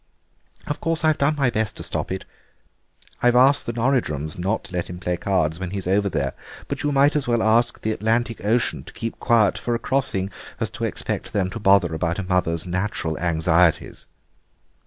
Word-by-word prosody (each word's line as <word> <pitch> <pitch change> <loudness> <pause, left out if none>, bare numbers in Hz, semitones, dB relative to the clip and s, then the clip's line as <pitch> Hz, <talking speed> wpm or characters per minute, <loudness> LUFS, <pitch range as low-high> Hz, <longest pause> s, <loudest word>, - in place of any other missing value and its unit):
Of 145 - -4
course 165 -1 +1
I've 155 -1 +3
done 145 +2 +2
my 135 -4 +2
best 110 -2 -2
to - - -6
stop - - -3
it; 95 0 -4 1.0
I've 120 0 +4
asked 135 +3 +5
the 120 - -2
Norridrums 115 - 0
not 95 +5 -1
to - - -12
let 90 -1 -2
him 90 - -6
play 90 0 -2
cards 85 -3 0
when 95 -1 -4
he's 95 0 -4
over 100 +2 +2
there, 70 -6 -1 0.3
but - - -3
you 145 - 0
might 140 +2 +4
as 145 -4 0
well 120 -2 +2
ask 115 +2 +3
the 110 - -1
Atlantic 115 +1 -1
Ocean 115 +3 +1
to - - -12
keep 115 -1 -5
quiet 115 -5 +3
for 120 - -1
a - - +1
crossing 115 -6 -1 0.3
as - - -2
expect - - -3
them 95 -3 0
to 115 - -5
bother 95 -5 +4
about 85 +1 -1
a 100 - -2
mother's 90 -3 0
natural 90 -3 -2
anxieties." 85 0 +1
100 Hz, 195 wpm, -23 LUFS, 90-120 Hz, 1.0 s, asked